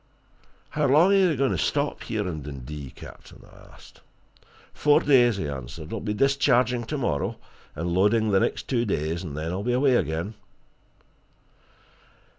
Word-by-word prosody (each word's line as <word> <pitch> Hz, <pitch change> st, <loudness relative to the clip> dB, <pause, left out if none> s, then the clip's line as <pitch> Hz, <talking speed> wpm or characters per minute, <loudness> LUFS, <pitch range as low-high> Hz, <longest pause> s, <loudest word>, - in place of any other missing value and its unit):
"How 150 Hz, -1 st, +1 dB
long 160 Hz, +9 st, +5 dB
are -, -, +5 dB
you 185 Hz, -5 st, +3 dB
going 135 Hz, 0 st, +1 dB
to -, -, -1 dB
stop 145 Hz, 0 st, -1 dB
here 105 Hz, -3 st, -3 dB
in 80 Hz, -4 st, -4 dB
Dundee, 70 Hz, 0 st, -8 dB
captain?" -, -, -14 dB
I -, -, -18 dB
asked. -, -, -17 dB, 0.7 s
"Four 150 Hz, 0 st, +4 dB
days," 120 Hz, -6 st, +4 dB
he 80 Hz, -, -3 dB
answered. 70 Hz, -, -7 dB
"I'll 115 Hz, -, -3 dB
be 105 Hz, 0 st, -3 dB
discharging 125 Hz, -2 st, +2 dB
tomorrow, 120 Hz, -, -2 dB, 0.4 s
and 85 Hz, +2 st, -3 dB
loading 105 Hz, +4 st, +2 dB
the 95 Hz, -, +4 dB
next -, -, -2 dB
two 120 Hz, -3 st, +1 dB
days, 80 Hz, -5 st, -2 dB
and 75 Hz, -6 st, -7 dB
then 80 Hz, +2 st, -3 dB
I'll 95 Hz, +2 st, -3 dB
be 120 Hz, +4 st, -1 dB
away 130 Hz, +1 st, +3 dB
again." 80 Hz, +7 st, -2 dB
105 Hz, 160 wpm, -25 LUFS, -, 0.7 s, long